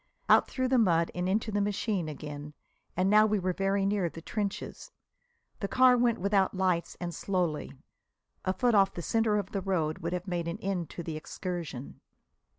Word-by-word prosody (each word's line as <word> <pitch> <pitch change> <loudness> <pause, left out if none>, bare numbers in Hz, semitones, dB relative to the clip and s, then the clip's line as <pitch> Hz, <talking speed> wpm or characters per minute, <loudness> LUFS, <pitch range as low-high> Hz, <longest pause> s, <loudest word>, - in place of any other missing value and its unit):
Out - - +6
through 260 -1 -1
the 260 -1 +4
mud 170 -6 +3
and 180 +1 -1
into 215 +3 0
the 205 0 +1
machine 200 -4 -1
again. 150 0 -7 0.4
And 185 +1 +2
now 215 +2 +6
we 215 0 +1
were 185 -1 -1
very 195 +1 +1
near 195 -3 +1
the 165 - -10
trenches. 200 +4 -4 0.7
The 200 - -2
car 255 +3 +5
went 240 -1 +2
without 195 0 +2
lights 180 -3 0
and 175 -1 -4
slowly. 175 -3 -2 0.7
A 185 - +1
foot 240 +5 +1
off 195 -2 +4
the 175 - -5
centre 225 +1 +2
of 205 - -3
the 195 - -2
road 175 -4 -1
would 170 -1 -3
have 180 +1 -4
made 175 -2 -2
an 170 - -3
end 185 -4 -3
to 170 - -7
the 160 -1 -4
excursion. 165 -5 -6
190 Hz, 190 wpm, -29 LUFS, 170-205 Hz, 0.7 s, Out